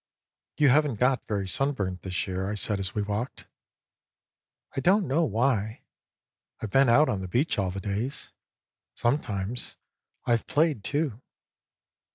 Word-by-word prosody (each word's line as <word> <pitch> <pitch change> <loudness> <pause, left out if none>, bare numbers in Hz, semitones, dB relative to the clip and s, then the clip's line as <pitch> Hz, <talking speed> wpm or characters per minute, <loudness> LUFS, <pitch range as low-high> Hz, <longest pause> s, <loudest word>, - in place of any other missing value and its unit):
" - - -61
You 145 -2 +5
haven't 145 -1 +3
got 130 +1 +2
very 100 -3 -1
sunburnt 100 -8 -1
this 90 -1 -2
year," 95 0 -3
I 105 - -2
said 105 0 -1
as 95 +3 -2
we 105 - 0
walked. 105 +5 -4 0.7
" - - -35
I - - 0
don't 190 +7 +3
know 155 +6 +2
why. 110 -4 0 0.8
I've 110 - -5
been 135 -2 +5
out 145 +6 +6
on 95 - -1
the 95 - -4
beach 120 - +1
all 95 -1 +1
the 95 +2 -4
days. 105 +8 -3 0.6
Sometimes 120 -3 -1 0.5
I've 115 -2 +1
played, 155 -8 +2
too." 140 -4 -1
115 Hz, 155 wpm, -27 LUFS, 100-140 Hz, 0.8 s, out